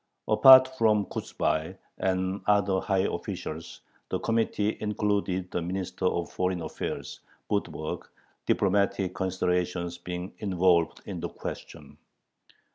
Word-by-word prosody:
Apart 130 -1 +9
from 105 -3 +3
Kochubay 80 +1 -2 0.2
and 95 +1 0
other 100 -2 +3
high 95 -2 +1
officials, 80 +1 -6 0.3
the - - -1
committee 110 -2 0
included 100 -3 -1
the 90 - -1
Minister 90 +1 -3
of 85 -2 0
Foreign 90 -2 -1
Affairs, 80 - -5 0.3
Budberg, 90 -6 -3 0.4
diplomatic 100 -1 +1
considerations 90 -2 -1
being 90 +1 -6
involved 90 -4 +2
in - - -5
the - - -4
question. - - -9
95 Hz, 110 wpm, -28 LUFS, 90-100 Hz, 0.4 s, Apart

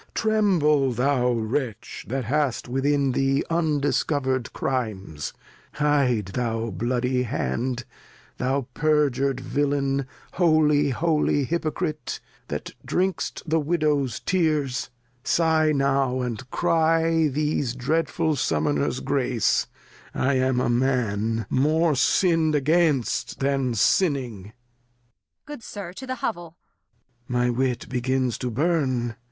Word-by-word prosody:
Tremble 170 - +2
thou 125 0 +2
Wretch, 115 0 -3
That 130 0 -2
hast 140 0 0
within 135 +2 +1
thee 135 +2 +1
undiscover'd 145 -5 0
Crimes! 100 - -3 0.4
Hide, 140 -7 +2
that 115 -2 -2
bloody 125 +2 0
Hand, 120 - -2 0.5
Thou 130 +1 0
perjur'd 140 -3 +1
Villain, 140 0 0 0.3
holy 150 -2 +2
Hypocrite, 155 0 -3 0.3
That - - -5
drink'st 185 +1 -1
the 160 +1 +2
Widows 150 -6 0
Tears, 155 -9 0 0.3
sigh 160 +1 +2
now, 135 -2 +1
and 125 +1 -4
cry 165 +1 +2
These 145 -3 -1
dreadful 160 +4 0
Summoners 75 - 0
Grace, 130 -5 +1 0.5
I 135 +2 +1
am 130 -1 +1
a - - +1
Man 115 -3 0
More 155 +4 +2
sin'd 165 +2 +2
against, 145 -5 +1
than 135 -3 0
sinning. 125 - +1
Kent. 105 - -15 0.9
Good 295 -4 -8
Sir, 195 -5 -7
to 260 +7 -9
th' 255 0 -3
Hovell. 175 -6 -4 0.7
Lear. 125 0 0
My 125 - +2
Wit 125 0 -1
begins 130 -1 -1
to 125 - -2
burn. 130 -4 0
135 Hz, 105 wpm, -24 LUFS, 125-155 Hz, 0.9 s, Tremble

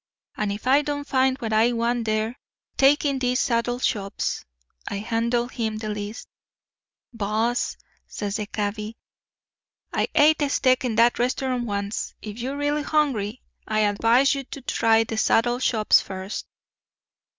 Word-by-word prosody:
'And 210 -1 -1
if 205 +3 -6
I 270 +3 +5
don't 285 -1 -4
find 260 0 +2
what 225 -4 -3
I 225 +3 +4
want 235 0 0
there, 220 +3 -1 0.4
take 280 +2 +4
in 280 -2 +1
these 250 0 +1
saddle 240 0 0
shops.' 205 -5 -2 0.4
I 200 - -3
handed 235 +3 -1
him 220 -2 -2
the 215 0 -5
list. 210 +1 -5 0.9
"'Boss,' 225 +2 -1 0.3
says 205 0 -4
the 210 -1 -4
cabby, 210 +1 -4 1.0
'I - - +1
et 305 +1 +5
a 290 - +1
steak 255 -2 +2
in 240 -3 -1
that 235 +2 +4
restaurant 250 0 0
once. 200 0 -3
If 215 +1 -8
you're 265 +4 -3
real 290 +1 0
hungry, 260 -8 0 0.2
I 215 0 +1
advise 230 +6 +3
you 275 -1 -3
to 275 - -9
try 225 -3 +3
the 225 0 -5
saddle 240 +2 +2
shops 220 -4 +4
first. 190 +1 -6
230 Hz, 150 wpm, -24 LUFS, 215-260 Hz, 1.0 s, I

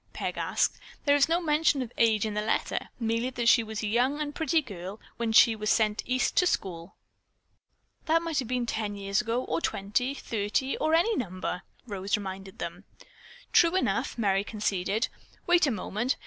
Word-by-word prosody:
Peg - - -3
asked. - - 0 0.3
"There 285 -1 +5
is 285 +2 +3
no 335 +1 +3
mention 300 -4 +2
of 240 - -9
age 220 -2 +3
in 215 - -3
the 210 - -1
letter. 215 - -1
Merely 230 +1 0
that 245 -2 -2
she 235 - +7
was 220 0 -5
a - - 0
young 250 +7 +1
and 295 -1 -3
pretty 320 +1 +2
girl 200 - -7 0.2
when 235 -1 -1
she 225 +1 +6
was 215 0 -2
sent 215 -1 +2
East 255 0 +1
to 360 - +5
school." 175 - -3 1.1
"That 330 +1 +3
might 330 -3 -1
have 255 - -3
been 250 0 -1
ten 215 -3 -3
years 200 +2 0
ago 240 +1 -1
or - - -2
twenty, 220 +6 -1
thirty, 225 +3 -1
or 315 +1 +2
any 425 +7 +3
number," 185 - -3 0.2
Rose 200 -2 -1
reminded 195 -1 -7
them. - - -6 0.7
"True 340 +1 +5
enough," 375 - 0
Merry 195 -3 +2
conceded. 205 0 -1 0.4
"Wait 350 -2 +4
a - - +2
moment. 225 +3 -1
230 Hz, 185 wpm, -28 LUFS, 205-280 Hz, 1.1 s, she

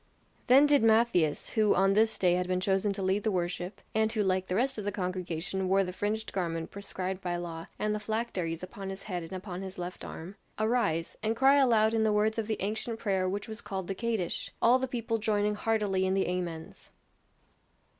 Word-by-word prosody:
Then 270 +4 +7
did 290 -1 +4
Matthias 220 -9 +3
who 215 -2 +3
on 195 +1 +4
this 220 +2 +3
day 180 -2 +3
had 180 0 0
been 185 0 0
chosen 195 +2 +1
to 195 -1 -4
lead 190 +2 +1
the 220 - 0
worship, 180 +1 -3
and 220 0 +2
who 220 -2 +1
like 185 -1 0
the 180 - -1
rest 260 +2 +1
of - - -4
the 205 - -1
congregation 185 -1 -3
wore 195 +1 +4
the 180 -1 -5
fringed 215 +3 -2
garment 165 -3 -2
prescribed 190 -1 -5
by 175 -2 -2
law 170 -1 -5
and 210 0 0
the 210 - -2
phylacteries 200 -7 -3
upon 195 +1 -7
his 195 0 -6
head 180 -4 -3
and 165 +2 -8
upon 185 -1 -6
his 190 0 -7
left 180 +1 -6
arm 180 +5 -8 0.2
arise, 215 -8 0
and 220 +1 0
cry 270 +3 +5
aloud 225 -5 +4
in 225 -1 +2
the 215 - +3
words 215 +2 +2
of 215 - -2
the 220 - -1
ancient 220 +3 -2
prayer 190 -4 0
which 200 +2 -3
was 220 0 -7
called 190 -2 -4
the 195 - -3
Kadish; 220 -4 -2
all 245 +3 +5
the 260 - -1
people 230 -2 -2
joining 210 -1 +1
heartily 205 -3 0
in 190 - +1
the 195 - +1
Amens. 175 -3 -5
195 Hz, 215 wpm, -30 LUFS, 180-220 Hz, 0.2 s, Then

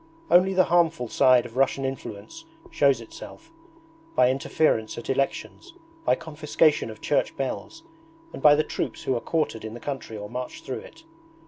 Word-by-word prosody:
Only 185 +2 +5
the 185 - +6
harmful 165 -6 +2
side 125 +1 +4
of 120 +1 -10
Russian 135 0 +2
influence 130 - -7 0.3
shows 140 -4 +3
itself 325 - -12 0.6
by 125 - +5
interference 130 -4 0
at 120 - -3
elections, 140 - -3 0.3
by - - +4
confiscation 150 -3 +1
of 110 -1 -10
church 145 - 0
bells, 230 - -5 0.5
and - - -8
by 150 -1 +7
the 155 - +2
troops - - -4
who 130 - 0
are 120 - -2
quartered 155 -9 -1
in 110 +1 -6
the - - -8
country 135 -6 -5
or 105 0 -6
march 125 +3 -6
through - - -4
it. - - -15
135 Hz, 165 wpm, -25 LUFS, 120-165 Hz, 0.6 s, by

